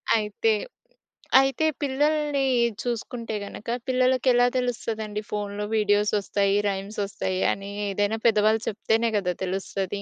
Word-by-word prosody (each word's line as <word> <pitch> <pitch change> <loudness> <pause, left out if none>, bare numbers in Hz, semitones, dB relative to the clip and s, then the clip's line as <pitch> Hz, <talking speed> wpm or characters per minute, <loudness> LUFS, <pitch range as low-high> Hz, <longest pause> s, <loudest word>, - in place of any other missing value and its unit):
అయితే, 210 0 0 0.9
అయితే 270 +3 +2 0.2
పిల్లల్ని 290 +1 +1 0.4
చూసుకుంటే 235 -1 -4
గనక 205 - -10 0.2
పిల్లలకి 255 0 +2
ఎలా 245 0 +5
తెలుస్తదండి? 220 -4 -2
ఫోన్‌లో 205 0 -3
వీడియోస్ 205 -1 +2
వస్తాయి. 200 0 +1
రైమ్స్ 195 +2 -5
వస్తాయి. 185 -1 -3
అని 195 0 -5 0.2
ఏదైనా 205 +2 0
పెద్దవాళ్ళు 215 0 +3
చెప్తేనే 225 +2 +1
కదా! 180 -3 0
తెలుస్తది. 195 +1 -3
215 Hz, 115 wpm, -25 LUFS, 200-245 Hz, 0.9 s, ఎలా